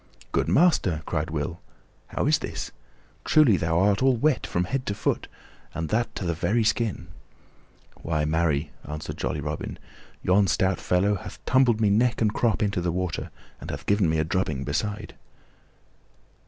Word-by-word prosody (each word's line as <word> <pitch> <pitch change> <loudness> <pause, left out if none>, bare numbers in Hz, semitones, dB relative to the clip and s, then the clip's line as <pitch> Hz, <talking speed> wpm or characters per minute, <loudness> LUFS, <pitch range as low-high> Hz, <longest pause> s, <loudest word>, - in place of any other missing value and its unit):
"Good - - +1
master," 105 - +3
cried 80 +1 -2
Will, 80 +2 -3 0.5
"how - - -2
is - - +3
this? - - -5 0.5
Truly 150 -9 +5
thou 80 -1 0
art 100 +2 +3
all 130 -1 +4
wet 145 +3 +1
from 85 - 0
head 130 +8 -2
to 100 - -1
foot, - - -1 0.5
and 80 -1 -3
that 115 +2 0
to 95 - -4
the 85 - 0
very 110 +8 +1
skin." 105 -5 -1 0.9
"Why, 75 -2 0
marry," 80 -1 0
answered 75 +1 -6
jolly - - -2
Robin, - - -4 0.5
"yon 95 +2 +4
stout 95 +4 +1
fellow 95 +3 +2
hath - - -9
tumbled 125 -4 +4
me 105 -2 +3
neck 115 +3 +2
and 105 -2 +2
crop 115 -2 +1
into 100 -3 0
the 85 0 0
water 90 0 -3 0.3
and - - -8
hath - - -6
given 100 -4 +2
me 80 - +1
a 80 - +2
drubbing 75 -5 -1
beside." 105 +9 -3
95 Hz, 170 wpm, -25 LUFS, 80-110 Hz, 0.9 s, Truly